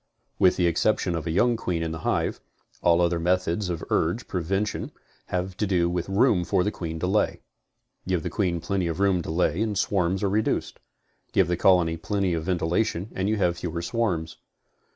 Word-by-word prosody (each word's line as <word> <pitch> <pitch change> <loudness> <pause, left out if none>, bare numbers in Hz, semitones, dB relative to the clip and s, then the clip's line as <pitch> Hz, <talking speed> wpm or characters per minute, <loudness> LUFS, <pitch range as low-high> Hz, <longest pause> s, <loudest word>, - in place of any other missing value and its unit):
With 90 - +5
the 90 - +1
exception 90 +1 +1
of 80 0 -4
a - - -1
young 120 +8 +3
queen 90 -7 -2
in 80 - -2
the 80 - -5
hive, - - -1 0.4
all 85 0 +4
other 85 -1 +1
methods 90 +2 0
of 85 -2 -3
urge 90 +9 0
prevention 95 +4 -2 0.4
have 90 +1 -3
to 105 - 0
do 85 -3 +2
with 90 +1 -2
room 100 -2 +3
for 90 +1 +1
the 105 - 0
queen 80 -4 -5
to - - 0
lay. 100 +3 +1 0.7
Give 90 -4 0
the - - -3
queen 90 -5 0
plenty 90 +1 -1
of 80 +1 -3
room 95 -3 +3
to - - -7
lay 85 +3 +1
and 110 -3 -1
swarms 95 -1 0
are - - +3
reduced. 110 +2 -1 0.5
Give 95 -4 +4
the 90 - +1
colony 85 -2 +3
plenty 95 +1 -1
of 80 -1 -2
ventilation 90 +3 0
and 95 +2 -1
you 110 - +2
have 90 -4 0
fewer 85 -1 -4
swarms. 85 -7 -1
90 Hz, 195 wpm, -25 LUFS, 85-100 Hz, 0.7 s, With